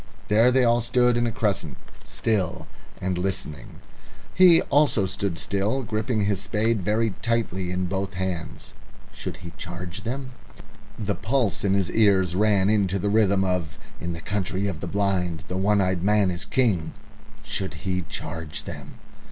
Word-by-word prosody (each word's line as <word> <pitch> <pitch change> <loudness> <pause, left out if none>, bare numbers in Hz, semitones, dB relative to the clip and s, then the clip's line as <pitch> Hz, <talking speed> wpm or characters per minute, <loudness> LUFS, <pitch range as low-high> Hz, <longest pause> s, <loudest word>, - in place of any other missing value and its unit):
There 115 +4 +5
they 130 0 +4
all 120 0 +3
stood 125 +1 +3
in 120 0 +1
a - - -1
crescent, 100 -7 -1 0.3
still 100 -7 -1 0.3
and 90 -1 -1
listening. 90 -5 -4 0.5
He 180 -3 +7
also 140 -8 +3
stood 95 -2 -2
still, 105 +9 0
gripping 110 -1 -1
his 100 -2 0
spade 110 0 0
very 110 +4 +1
tightly 115 -6 -1
in 90 +1 -1
both 95 +1 -3
hands. 90 -3 -4 0.4
Should - - -6
he 85 - -8
charge 90 +2 -6
them? 130 +4 -4 0.7
The 105 -2 -1
pulse 115 -2 0
in 100 -1 +2
his 95 -3 0
ears 95 -5 +3
ran 100 -1 +3
into 100 -3 +2
the 100 +2 -1
rhythm 100 -3 +3
of 90 -5 -2 0.2
"In 85 0 -3
the 85 - -7
Country 95 0 -2
of 95 -6 -3
the - - -5
Blind 90 -5 0
the 90 - -4
One 100 +2 +3
eyed 90 -2 0
Man 100 0 +3
is 85 - -4
King!" 100 -12 +1 0.5
Should 95 - -3
he 90 -1 0
charge 75 -3 -5
them? - - -9
100 Hz, 160 wpm, -25 LUFS, 90-110 Hz, 0.7 s, He